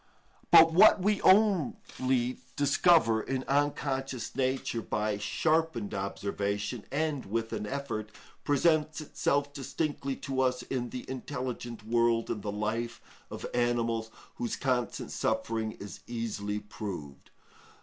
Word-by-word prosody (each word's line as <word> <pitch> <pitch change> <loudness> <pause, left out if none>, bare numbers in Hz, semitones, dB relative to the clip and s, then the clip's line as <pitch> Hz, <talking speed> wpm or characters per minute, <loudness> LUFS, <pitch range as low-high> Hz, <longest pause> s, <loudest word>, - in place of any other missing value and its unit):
But 160 0 +8
what 200 +4 +7
we 205 +2 +1
only 135 - +2 0.2
discover 145 -5 +4
in 130 +3 -2
unconscious 135 -3 -1
Nature 130 -3 -1
by 105 +2 -1
sharpened 155 -2 0
observation, 100 +3 -3
and 145 -3 -1
with 115 +2 -2
an 105 -1 -3
effort, 130 -6 -4 0.3
presents 155 +2 +2
itself 145 -1 -1
distinctly 140 0 -3
to 135 -1 -2
us 125 -1 +1
in 125 -2 -3
the 125 - -7
intelligent 125 -4 -5
world 115 0 +2
in 105 - -3
the 105 - -3
life 115 +3 -2 0.3
of - - -6
animals, 115 -2 0 0.3
whose 120 - -2
constant 125 -3 -1
suffering 110 -1 -1
is 100 0 -9
easily 110 -3 -3
proved. 100 -9 -7
125 Hz, 120 wpm, -30 LUFS, 110-140 Hz, 0.3 s, But